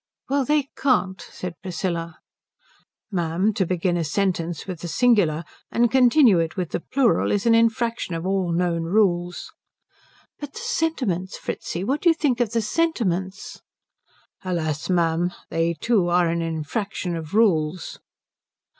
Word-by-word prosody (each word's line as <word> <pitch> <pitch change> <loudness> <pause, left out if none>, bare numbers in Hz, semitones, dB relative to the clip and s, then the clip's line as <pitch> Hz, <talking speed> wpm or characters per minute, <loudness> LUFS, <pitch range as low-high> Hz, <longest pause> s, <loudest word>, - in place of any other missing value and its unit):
"Well, 275 0 +1
they 295 0 +1
can't," 210 -9 +1
said 180 -4 -8
Priscilla. 170 -2 -3 0.9
"Ma'am, 180 +3 0
to 190 -3 0
begin 180 0 0
a 170 - 0
sentence 170 0 -1
with 185 -4 -6
the 175 - -6
singular 170 - +2 0.3
and 235 0 +2
continue 250 - +5
it 165 +3 -2
with 180 -3 -2
the - - -1
plural 255 +5 +1
is 205 +1 0
an 230 - +5
infraction 230 -4 +1
of 165 +1 -4
all 190 -2 0
known 170 -1 0
rules." 175 -2 0 0.9
"But 290 -1 -7
the - - -7
sentiments, 300 - -1
Fritzi 175 - -4
what 275 +8 -1
do 350 - +5
you 330 - +4
think 270 -6 0
of 240 -4 +1
the 230 -1 0
sentiments?" 210 - -1 0.8
"Alas, 160 -5 -2
ma'am, 175 0 +1 0.2
they 165 +1 0
too 195 +2 +1
are 175 -1 +3
an 170 0 -1
infraction 170 +3 -3
of 160 +2 -6
rules." 175 -6 +1
185 Hz, 145 wpm, -23 LUFS, 170-230 Hz, 0.9 s, continue